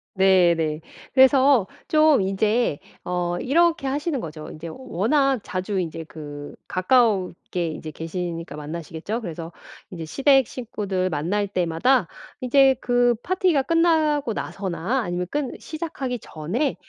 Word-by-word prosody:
네네. 170 Hz, -5 st, +3 dB, 0.3 s
그래서 265 Hz, -3 st, +5 dB, 0.2 s
좀 310 Hz, -5 st, +4 dB
인제 210 Hz, -1 st, +1 dB, 0.3 s
어 175 Hz, -1 st, -2 dB
이렇게 325 Hz, +1 st, +2 dB
하시는 290 Hz, +2 st, -1 dB
거죠. 155 Hz, -6 st, -7 dB
인제 160 Hz, +2 st, -8 dB
워낙 260 Hz, -, +1 dB
자주 190 Hz, +1 st, -3 dB
인제 165 Hz, -2 st, -4 dB
그 145 Hz, -2 st, -9 dB
가까웁게 185 Hz, -4 st, +1 dB
인제 155 Hz, 0 st, -6 dB
계시니까 165 Hz, 0 st, -5 dB
만나시겠죠? 165 Hz, +8 st, -5 dB
그래서 165 Hz, -4 st, -6 dB, 0.4 s
인제 165 Hz, -3 st, -7 dB
시댁 270 Hz, -, +3 dB
식구들 200 Hz, -6 st, -3 dB
만날 180 Hz, +7 st, -1 dB
때마다 185 Hz, +5 st, +1 dB, 0.3 s
이제 265 Hz, +1 st, +5 dB
그 245 Hz, -1 st, +2 dB
파티가 360 Hz, -6 st, +2 dB
끝나고 310 Hz, -5 st, +2 dB
나서나 195 Hz, +6 st, -2 dB
아니면 175 Hz, -3 st, -2 dB
끝 290 Hz, -3 st, -3 dB
시작하기 285 Hz, -6 st, -5 dB
전에 200 Hz, -, -2 dB
205 Hz, 275 characters per minute, -23 LUFS, 170-270 Hz, 0.4 s, 그래서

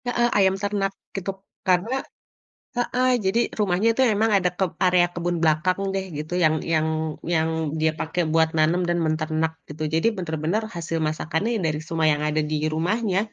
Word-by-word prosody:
Heeh, 240 Hz, -1 st, +2 dB
ayam 190 Hz, -1 st, +4 dB
ternak, 200 Hz, -1 st, -1 dB, 0.2 s
gitu. 195 Hz, 0 st, -2 dB, 0.4 s
Karena, 205 Hz, +9 st, +2 dB, 0.8 s
heeh 250 Hz, +1 st, +1 dB, 0.2 s
jadi 190 Hz, +5 st, +2 dB, 0.2 s
rumahnya 200 Hz, +1 st, +2 dB
itu 265 Hz, -, +2 dB
emang 220 Hz, +2 st, +2 dB
ada 180 Hz, -2 st, +2 dB
keb 190 Hz, -3 st, +1 dB
area 180 Hz, -1 st, +5 dB
kebun 175 Hz, 0 st, -1 dB
belakang 165 Hz, +4 st, +2 dB
deh, 195 Hz, 0 st, -1 dB
gitu, 155 Hz, +3 st, -6 dB
yang 155 Hz, 0 st, +4 dB, 0.2 s
yang 160 Hz, 0 st, +2 dB, 0.5 s
yang 160 Hz, 0 st, +2 dB, 0.3 s
dia 160 Hz, 0 st, +3 dB
pakai 170 Hz, +2 st, -1 dB
buat 160 Hz, 0 st, +4 dB
nanam 165 Hz, +4 st, +3 dB
dan 175 Hz, 0 st, +1 dB
menternak, 155 Hz, 0 st, 0 dB, 0.2 s
gitu. 155 Hz, +1 st, -6 dB
Jadi 165 Hz, +6 st, +2 dB
bener-bener 165 Hz, +3 st, -1 dB
hasil 165 Hz, -1 st, -3 dB
masakannya 160 Hz, +6 st, -1 dB
ya, 220 Hz, -, -1 dB
dari 150 Hz, -1 st, -1 dB
semua 160 Hz, -1 st, 0 dB
yang 150 Hz, 0 st, -2 dB
ada 155 Hz, +1 st, +1 dB
di 155 Hz, -, 0 dB, 0.2 s
rumahnya. 190 Hz, +4 st, 0 dB
175 Hz, 170 wpm, -24 LUFS, 160-195 Hz, 0.8 s, area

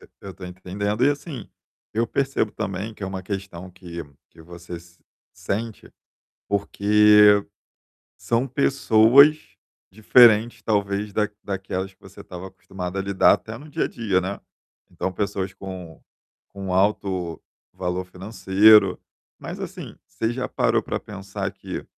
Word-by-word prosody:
E -, -, -17 dB
eu 95 Hz, -1 st, -9 dB
tô 95 Hz, -, -10 dB
entendendo 100 Hz, +5 st, -2 dB
e, 145 Hz, -, +5 dB
assim, 145 Hz, -4 st, -6 dB, 0.4 s
eu 115 Hz, +2 st, 0 dB
percebo 135 Hz, -3 st, -1 dB
também 100 Hz, +3 st, -4 dB
que 105 Hz, -, -13 dB
é -, -, -2 dB
uma 95 Hz, 0 st, -5 dB
questão 95 Hz, -2 st, -6 dB
que 85 Hz, -2 st, -8 dB, 0.3 s
que 80 Hz, -, -17 dB
você 85 Hz, +1 st, -9 dB, 0.6 s
sente, 110 Hz, +2 st, -5 dB, 0.6 s
porque 105 Hz, 0 st, +5 dB, 0.7 s
são 120 Hz, +3 st, 0 dB
pessoas 135 Hz, +1 st, +5 dB, 0.5 s
diferentes, 110 Hz, +2 st, +5 dB
talvez 100 Hz, -1 st, -1 dB
da-daquelas 95 Hz, -2 st, -3 dB
que -, -, -48 dB
você 95 Hz, 0 st, -14 dB
estava 90 Hz, +1 st, -9 dB
acostumada 90 Hz, 0 st, -7 dB
a -, -, 0 dB
lidar 100 Hz, -1 st, +4 dB
até -, -, -7 dB
no 150 Hz, -, -12 dB
dia -, -, -1 dB
a -, -, -2 dB
dia, 100 Hz, -5 st, 0 dB
né. 95 Hz, +2 st, -4 dB, 0.5 s
Então, 95 Hz, -, -3 dB
pessoas 100 Hz, -1 st, -3 dB
com 90 Hz, -4 st, -9 dB, 0.5 s
com 95 Hz, -2 st, -6 dB
alto 95 Hz, -3 st, 0 dB, 0.3 s
valor 90 Hz, 0 st, -3 dB
financeiro. 100 Hz, +3 st, +4 dB, 0.4 s
Mas, -, -, -7 dB
assim, -, -, -8 dB
você 115 Hz, +1 st, -2 dB
já 125 Hz, +1 st, -3 dB
parou -, -, +1 dB
pra -, -, -4 dB
pensar 100 Hz, -1 st, -6 dB
que, 95 Hz, -1 st, -7 dB
100 Hz, 135 wpm, -23 LUFS, 95-110 Hz, 0.7 s, e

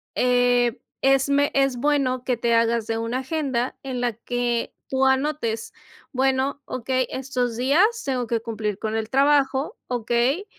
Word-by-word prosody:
eh, 245 Hz, -1 st, +2 dB, 0.2 s
es 270 Hz, 0 st, +3 dB
me 285 Hz, +1 st, +2 dB
es 275 Hz, -2 st, +2 dB
bueno 255 Hz, -2 st, +1 dB
que 250 Hz, -3 st, 0 dB
te 235 Hz, 0 st, +1 dB
hagas 230 Hz, -1 st, +2 dB
de 225 Hz, -, -1 dB
una 230 Hz, +3 st, -2 dB
agenda 265 Hz, -3 st, -2 dB
en 260 Hz, -2 st, -4 dB
la 240 Hz, -1 st, 0 dB
que 240 Hz, +1 st, -2 dB
tú 265 Hz, 0 st, +1 dB
anotes, 265 Hz, -4 st, -1 dB, 0.4 s
bueno, 265 Hz, +1 st, 0 dB
okey, 255 Hz, +1 st, -1 dB
estos 250 Hz, -3 st, -2 dB
días 280 Hz, +9 st, +4 dB, 0.2 s
tengo 255 Hz, -3 st, -1 dB
que 230 Hz, 0 st, 0 dB
cumplir 215 Hz, -3 st, -3 dB
con 220 Hz, +1 st, -3 dB
el 220 Hz, 0 st, -2 dB
trabajo, 280 Hz, -, +2 dB
okey, 245 Hz, -, 0 dB
255 Hz, 155 wpm, -23 LUFS, 235-270 Hz, 0.4 s, días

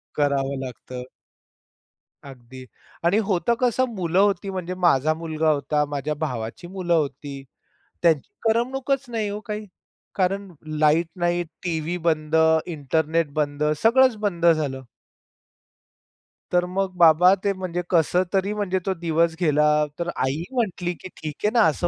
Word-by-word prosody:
करावं 140 Hz, -2 st, 0 dB
लागतं. 125 Hz, 0 st, -8 dB, 1.2 s
अगदी 130 Hz, -1 st, -11 dB, 0.4 s
आणि 190 Hz, +5 st, +4 dB
होतं 200 Hz, +4 st, +1 dB
कसं 250 Hz, +1 st, +2 dB
मुलं 180 Hz, -1 st, 0 dB
होती, 200 Hz, -1 st, +2 dB
म्हणजे 185 Hz, -1 st, -4 dB
माझा 155 Hz, -4 st, +3 dB
मुलगा 160 Hz, -1 st, -1 dB
होता, 150 Hz, 0 st, 0 dB
माझ्या 145 Hz, +1 st, -3 dB
भावाची 140 Hz, 0 st, -5 dB
मुलं 180 Hz, -2 st, -2 dB
होती. 140 Hz, -2 st, -2 dB, 0.6 s
त्यांची 160 Hz, -5 st, +3 dB, 0.2 s
करमणूकच 265 Hz, +4 st, 0 dB
नाही 220 Hz, -3 st, -2 dB
ओ 205 Hz, +1 st, -4 dB
काही. 210 Hz, 0 st, -4 dB, 0.5 s
कारण 195 Hz, +1 st, -1 dB, 0.3 s
लाईट 155 Hz, +2 st, +3 dB
नाही, 175 Hz, 0 st, +1 dB, 0.2 s
टीव्ही 170 Hz, 0 st, -2 dB
बंद, 155 Hz, -1 st, +1 dB, 0.3 s
इंटरनेट 160 Hz, 0 st, 0 dB
बंद, 145 Hz, 0 st, -2 dB, 0.2 s
सगळंच 250 Hz, +2 st, +5 dB
बंद 175 Hz, -5 st, 0 dB
झालं. 150 Hz, -5 st, +2 dB, 1.7 s
तर 180 Hz, 0 st, +3 dB
मग 190 Hz, -1 st, 0 dB
बाबा 175 Hz, +2 st, +7 dB
ते 200 Hz, -, +3 dB
म्हणजे 180 Hz, -2 st, -3 dB
कसं 175 Hz, +1 st, +3 dB
तरी 195 Hz, +2 st, +1 dB
म्हणजे 200 Hz, -3 st, -1 dB
तो 190 Hz, -, +1 dB
दिवस 165 Hz, -1 st, 0 dB
गेला. 150 Hz, -1 st, +3 dB
तर 170 Hz, 0 st, -2 dB, 0.2 s
आई 145 Hz, +5 st, -2 dB
म्हटली, 190 Hz, -8 st, -1 dB
की 185 Hz, -, -10 dB
"ठीक 155 Hz, -2 st, -5 dB
आहे 210 Hz, -, +5 dB
ना 235 Hz, -, +5 dB
असं 175 Hz, +3 st, 0 dB
170 Hz, 135 wpm, -23 LUFS, 150-190 Hz, 1.7 s, बाबा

